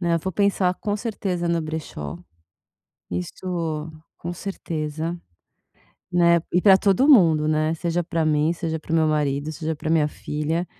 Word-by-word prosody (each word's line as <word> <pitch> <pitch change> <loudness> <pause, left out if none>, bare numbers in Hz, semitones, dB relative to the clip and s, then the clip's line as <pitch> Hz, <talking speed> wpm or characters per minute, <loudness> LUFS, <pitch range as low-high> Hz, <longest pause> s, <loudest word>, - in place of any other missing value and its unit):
Né, 170 -2 +2
vou 190 +3 -4
pensar, 195 -1 +2
com 205 -1 -1
certeza, 195 -6 -3
no 170 -1 +1
brechó. 155 - -5 0.9
Isso 160 - -3 0.3
com 175 +1 -5
certeza, 165 -3 -4 1.0
né. 170 -1 +4
E 180 - +3
para 195 -2 +7
todo 205 +9 +3
mundo, 165 - +6
né, 155 +1 +1
seja 170 +1 -1
para 165 -2 -1
mim, 155 +1 +2
seja 165 -2 -3
para 160 - -8
o - - +3
meu 160 -1 +4
marido, 145 -1 0
seja 160 +1 -3
para 155 +1 -4
minha 155 -2 +3
filha, 155 +4 -3
165 Hz, 155 wpm, -23 LUFS, 155-180 Hz, 1.0 s, para